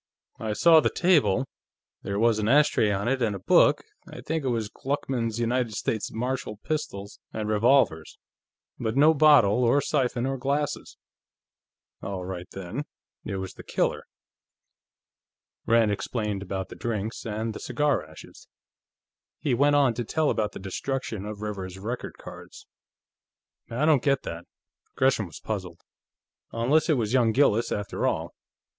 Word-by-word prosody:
"I 110 -1 -2
saw 165 +8 +6
the - - +2
table. 140 - +3 0.6
There 100 0 -3
was 115 0 +3
an 105 - -1
ashtray 145 -5 +4
on 100 +1 -1
it, 130 +1 0
and 110 -4 +1
a - - -6
book 95 - +4 0.3
I - - -9
think 160 -1 -2
it - - -2
was 115 -3 -1
Gluckman's 120 -2 -3
United 120 -1 0
States 110 0 -2
Martial 125 -1 -3
Pistols 100 -8 -5
and 110 -1 -4
Revolvers 110 - +2 0.6
but 115 +1 -2
no 155 +3 +6
bottle, 135 -7 +5
or 120 +4 +4
siphon, 130 -4 0
or 135 0 -2
glasses." 140 +2 -2 1.0
"All 95 -2 -5
right, 90 -1 -6
then; 95 +10 -6 0.4
it 100 - -3
was 95 -1 -5
the - - -11
killer." - - -1 1.6
Rand 115 -2 +4
explained 105 -1 -3
about 95 -1 -4
the - - -9
drinks, 110 -2 -4
and 110 0 -3
the - - -7
cigar 150 - 0
ashes. 75 0 -14 0.9
He 140 - -1
went 145 +4 +3
on 140 -4 +4
to 120 +1 -3
tell 155 +6 0
about 105 -1 -1
the - - -7
destruction 110 +2 -4
of 105 -1 -7
Rivers's 95 -3 -5
record 115 +6 -5
cards. - - -12 1.0
"I 125 +6 0
don't 155 -5 +4
get 140 0 +1
that." 85 +1 -6 0.5
Gresham 130 -6 +2
was 80 -2 -11
puzzled. 95 -6 -5 0.7
"Unless 135 +9 +2
it 155 - +3
was 110 -1 -1
young 120 -4 +4
Gillis, 120 -4 +3
after 105 -1 -2
all. - - -2
115 Hz, 150 wpm, -26 LUFS, 105-135 Hz, 1.6 s, saw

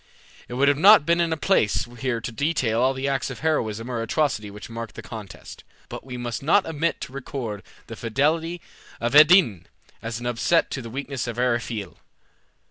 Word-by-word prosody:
It 120 - -7
would 140 +2 +3
not 200 -3 +7
be 170 - +3
in 170 -1 +1
place 145 - +1
here 130 -3 -1
to 115 - -6
detail 125 -4 0
all 130 +1 +2
the 130 +1 -2
acts 135 -1 -1
of 135 - -8
heroism 115 -8 -1
or 120 -2 -3
atrocity 115 -3 -1
which 105 +1 -10
marked 115 -1 -7
the 110 - -8
contest; 105 -2 -10 0.3
but - - -7
we 125 -1 -7
must 120 -1 -4
not 170 +8 +3
omit 165 +1 -1
to 130 - -7
record 125 -6 -5 0.2
the 115 - -8
fidelity 155 +9 -1 0.4
of 120 +2 -2
Evadne 150 - +6 0.4
as 115 0 -4
an 120 - -8
offset 120 +8 +1
to 135 - -3
the 115 - -8
weakness 135 0 -4
of 120 -1 -5
Eriphyle. 120 -5 -2
125 Hz, 185 wpm, -24 LUFS, 115-150 Hz, 0.4 s, not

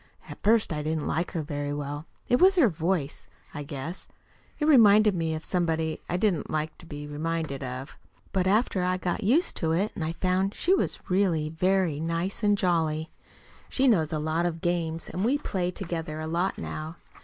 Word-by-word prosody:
At - - -10
first 220 -4 +3
I 150 - -2
didn't 155 0 -2
like 170 +2 -1
her 165 - -2
very 145 -1 -3
well. 145 +1 -4 0.2
It 245 - +4
was 380 +1 +7
her 300 - +5
voice, 165 -3 -2 0.3
I 150 - -5
guess. 145 +4 -6 0.5
It 300 - 0
reminded 215 -7 +6
me 165 -2 -1
of 155 - -6
somebody 160 -3 -1
I 175 - 0
didn't 190 -4 0
like 155 0 -2
to 170 - -12
be 145 -1 -7
reminded 155 -1 -3
of. 130 +1 -6 0.3
But 185 -1 +1
after 205 -1 +2
I 185 0 +1
got 180 +3 -2
used 275 - +3
to 160 -1 0
it 200 +6 +1
I 160 -1 -2
found 185 +3 0
she 365 - +2
was - - -1
really 180 -5 +1
very 180 -2 +1
nice 165 +5 -2
and 205 -1 +3
jolly. 160 -4 0 0.6
She 270 0 +2
knows 165 -11 +3
lots 160 +2 0
of 165 -1 -8
games, 165 -2 -1
and 185 - -3
we 255 +6 +3
play 185 -10 -2
together 165 -4 -4
a 155 - -4
lot 170 +4 -1
now. 155 +2 -5
170 Hz, 190 wpm, -27 LUFS, 155-195 Hz, 0.6 s, was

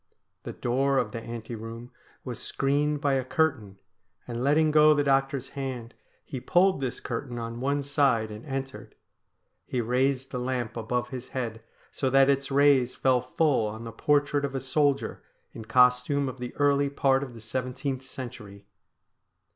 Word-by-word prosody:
The - - -6
door 135 +3 +1
of - - 0
the 115 - -5
ante 115 0 -7
room 115 +2 -8 0.3
was 125 -3 -5
screened 145 +2 0
by 140 -2 +2
a 135 -1 +1
curtain, 130 - 0 0.5
and 120 0 -4
letting 155 +3 +3
go 150 0 +6
the 145 - +2
doctor's 135 -1 +1
hand 130 -4 -5 0.3
he 130 - -5
pulled 180 +5 +3
this 130 -3 -3
curtain 120 0 -5
on 115 0 -5
one 140 +2 0
side 135 -6 +1
and 105 +2 -8
entered. 135 -1 -6 0.7
He 125 - -2
raised 130 +3 0
the 125 - -3
lamp 125 -2 -2
above 120 +1 -2
his 130 -1 -7
head 115 -3 -3 0.3
so 135 - -1
that 135 +1 +5
its 140 0 -1
rays 140 -3 +4
fell 130 -2 +2
full 130 -2 +1
on 110 +2 -6
the 115 - -6
portrait 145 +4 +1
of 140 -1 -3
a - - 0
soldier 140 +2 0 0.3
in 110 - -8
costume 125 +4 +3
of 130 0 -6
the 125 0 -6
early 145 -1 +2
part 135 -1 +2
of 130 -4 -7
the - - -10
seventeenth 130 +3 -3
century. 105 -7 -9
130 Hz, 170 wpm, -27 LUFS, 120-140 Hz, 0.7 s, go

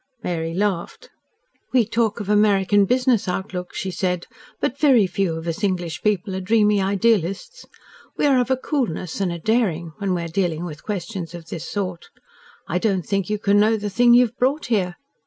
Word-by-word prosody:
Mary 165 -1 -2
laughed. 200 - -2 0.6
"We 245 -3 +4
talk 225 0 0
of 205 - -5
American 205 -1 +3
business 250 -1 +2
outlook," 180 -1 -4
she 190 - -3
said, 180 -1 -2 0.3
"but 270 - -2
very 260 -9 +5
few 185 -2 -1
of 160 0 -6
us 170 +5 -4
English 180 -4 -1
people 200 -2 0
are 190 - -3
dreamy 210 0 +3
idealists. 200 - 0 0.5
We - - +1
are 275 -3 +4
of 245 - -2
a 260 - +2
coolness 225 - -2
and 185 -3 0
a 170 - -4
daring 175 -4 0
when 195 -2 0
we 170 - -2
are - - -4
dealing 170 -1 -1
with 155 -3 -8
questions 180 -4 -5
of 165 -1 -10
this 165 - -6
sort. 185 -4 -4 0.6
I 180 - 0
don't 190 -4 0
think 195 -2 -1
you 210 - 0
can 205 0 +3
know 220 +2 +3
the 205 -1 -4
thing 240 +3 +5
you 250 +1 +6
have 240 +2 -9
brought 275 +5 +1
here. 180 -4 0
200 Hz, 195 wpm, -22 LUFS, 180-225 Hz, 0.6 s, you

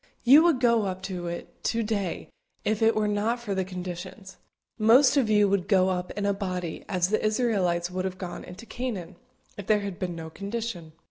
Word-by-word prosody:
You 275 +6 +8
would 325 -7 +3
go 235 -4 +3
up 185 0 -5
to 180 -3 -4
it 170 0 -7
to 230 0 +1
day 205 -5 -2 0.4
if 215 +2 0
it 225 0 +4
were 215 -1 +1
not 210 +4 0
for 220 -4 -4
the 190 -1 0
conditions; 185 +1 -7 0.4
most 245 +6 +6
of 260 -6 +2
you 210 -1 +4
would 195 -2 0
go 190 -2 +4
up 180 -1 -2
in 205 - -1
a 200 - +2
body, 180 -4 -4
as 180 -1 +1
the 215 - 0
Israelites 195 -6 +1
would 185 +1 -2
have 185 -1 -4
gone 180 -2 -6
into 180 +6 -11
Canaan, 210 -7 -5 0.4
if 195 - -7
there 210 -1 +3
had 200 -3 -5
been 180 -2 -3
no 160 -1 -7
condition. 200 -5 -5
200 Hz, 205 wpm, -27 LUFS, 180-225 Hz, 0.4 s, You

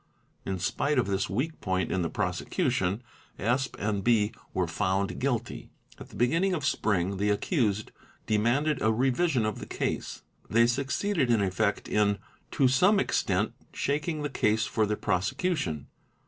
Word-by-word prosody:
In 95 - -1
spite 120 +9 0
of 125 - +3
this 95 0 -1
weak 135 +11 -2
point 95 -1 -1
in 95 - 0
the 85 - -1
prosecution, 95 +6 -1 0.3
Sp. 125 +5 0
& 100 -1 -1
B. 105 0 +3 0.2
were 95 - 0
found 95 +3 -1
guilty. 120 -3 -2 0.3
At - - -10
the - - -14
beginning 165 +10 +2
of 150 -4 -3
spring 100 -7 +1
the 100 +2 +1
accused 105 - 0 0.3
demanded 125 +7 +1
a 110 - +3
revision 130 +2 +2
of 110 - -2
the - - -7
case; - - -3 0.3
they 115 +2 +5
succeeded 140 +5 0
in 115 -2 +4
effect 100 +2 0
in 105 -1 +2 0.3
to 135 - +3
some 185 +11 +4
extent 100 - 0 0.2
shaking 150 +2 -1
the 145 - -1
case 110 +1 +2
for 110 -2 0
the 105 0 -1
prosecution. 100 - -1
110 Hz, 155 wpm, -28 LUFS, 100-140 Hz, 0.3 s, they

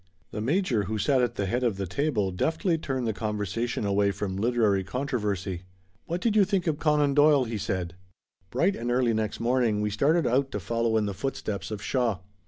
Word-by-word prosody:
The 105 - -4
major 130 - +1
who 110 +3 -2
sat 130 +4 +2
at 120 -1 0
the 100 - -1
head 120 +6 -1
of 115 -6 +1
the 100 - -2
table 105 - 0
deftly 160 - 0
turned 130 -5 -2
the 110 - 0
conversation 105 +2 -2
away 100 0 +2
from 95 -1 -3
literary 105 -2 +2
controversy. 105 -6 -2 0.5
"What 170 +2 -2
did 220 0 +1
you 210 - +6
think 190 -2 0
of 155 -3 0
Conan 150 -2 +2
Doyle?" 145 -1 +5
he 115 -3 -4
said. 95 -4 -3 0.6
Bright 175 +11 +1
and 120 +1 -4
early 120 -1 +2
next 110 -1 -2
morning 120 -3 +1
we 105 0 -1
started 150 +9 +2
out 135 +3 +1
to 105 - -1
follow 115 +3 0
in 110 - +1
the 100 - -2
footsteps 105 -4 -4
of 105 -2 -5
Shaw. 120 -6 0
115 Hz, 200 wpm, -27 LUFS, 105-140 Hz, 0.6 s, you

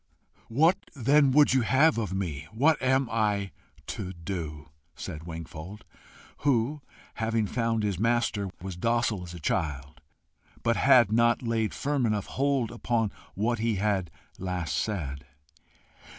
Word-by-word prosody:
"What 160 +10 +4 0.2
then 140 +2 +4
would 145 0 +5
you 130 - +4
have 140 +4 +4
of 105 -4 -2
me? 80 -6 -3
what 145 +7 +3
am 130 0 +2
I 105 -3 0 0.3
to 95 -2 -5
DO?" 80 -5 -6 0.3
said 80 +2 -7
Wingfold, 85 +4 -8 0.5
who, 140 +2 +1 0.3
having 110 -1 0
found 115 0 0
his 100 -4 -1
master, 115 -3 +1
was 95 -2 -5
docile 115 0 0
as 90 0 -8
a - - -8
child, 75 -2 -2 0.6
but 115 0 +2
had 125 -6 +5
not 120 +2 +3
laid 115 -2 -1
firm 140 -4 0
enough 105 -2 0
hold 135 -4 0
upon 115 -3 -1 0.2
what 115 +4 0
he 115 -1 +1
had 95 -3 0 0.3
last 90 -5 -2
said. 70 - -3
110 Hz, 135 wpm, -28 LUFS, 90-120 Hz, 0.6 s, would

